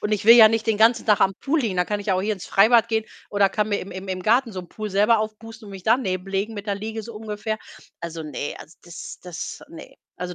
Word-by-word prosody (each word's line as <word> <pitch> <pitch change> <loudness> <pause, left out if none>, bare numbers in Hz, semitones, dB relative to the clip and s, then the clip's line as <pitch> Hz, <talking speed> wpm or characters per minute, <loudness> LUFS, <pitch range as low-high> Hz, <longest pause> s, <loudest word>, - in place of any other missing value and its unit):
und 210 - -2
ich 205 -2 -1
will 230 +2 +9
ja 220 -2 +9
nicht 225 +1 -1
den 220 -2 +1
ganzen 230 +2 +4
Tag 210 -2 +3
am 195 - +3
Pool 295 - -1
liegen. 215 -8 -2
Da 180 - +2
kann 205 +2 -3
ich 205 - -10
ja 190 - +2
auch 185 - 0
hier 215 +2 0
ins 190 -4 -7
Freibad 225 +3 +4
gehen 220 -1 0 0.2
oder 200 -1 +3
kann 210 +1 -1
mir 205 - 0
im 190 - -9
im 190 +1 -8
im 185 -1 -4
Garten 235 +3 +2
so 185 - -5
'n 175 - -14
Pool 215 -1 -6
selber 210 +4 +3
aufpusten 220 +1 -7
und 200 - -10
mich 190 -1 -9
daneben 195 -5 0
legen 195 +3 -2
mit 205 0 -7
der 200 - 0
Liege, 220 +2 -5
so 230 +1 -10
ungefähr. 215 0 -4 0.4
Also, 165 -1 -6
ne 150 -1 -5
also 160 - -13
das 175 0 -9
das 180 -2 -7
ne. 165 - -12 0.2
Also, 180 0 -5
210 Hz, 280 wpm, -23 LUFS, 190-220 Hz, 0.4 s, will